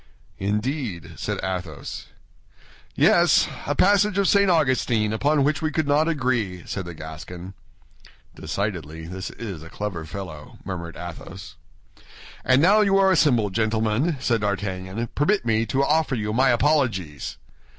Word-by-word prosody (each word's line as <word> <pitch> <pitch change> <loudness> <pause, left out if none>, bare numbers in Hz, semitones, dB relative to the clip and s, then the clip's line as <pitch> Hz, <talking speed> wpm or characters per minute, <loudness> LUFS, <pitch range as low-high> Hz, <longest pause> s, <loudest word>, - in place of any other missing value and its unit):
"Indeed?" 105 - -2
said - - -3
Athos. 90 -6 -5 0.9
"Yes; - - +5 0.2
a - - 0
passage 200 +1 +3
of 200 -1 +3
St. 200 0 +4
Augustine, 130 -9 +2
upon 145 +5 +2
which 150 +3 +1
we 155 - 0
could 155 -1 -1
not 150 +2 +3
agree," 125 - -1
said 95 - -4
the 85 -1 -8
Gascon. 85 +4 -9 0.8
"Decidedly, 80 -6 -4
this 95 +2 -6
is 100 -9 -7
a 80 - -11
clever 95 -3 -4
fellow," 85 -3 -8
murmured 85 -3 -6
Athos. 85 -1 -9 0.9
"And 130 +3 +4
now 205 +5 +6
you 195 -2 +3
are 195 -1 +5
assembled, 120 - +3
gentlemen," 110 - +1
said 115 -3 +1
D'Artagnan, 100 +1 -2
"permit 195 +6 +1
me 115 0 +1
to 135 +5 +1
offer 155 -2 +2
you 105 -2 -2
my 130 +3 +4
apologies." 120 - 0
110 Hz, 140 wpm, -24 LUFS, 95-145 Hz, 0.9 s, now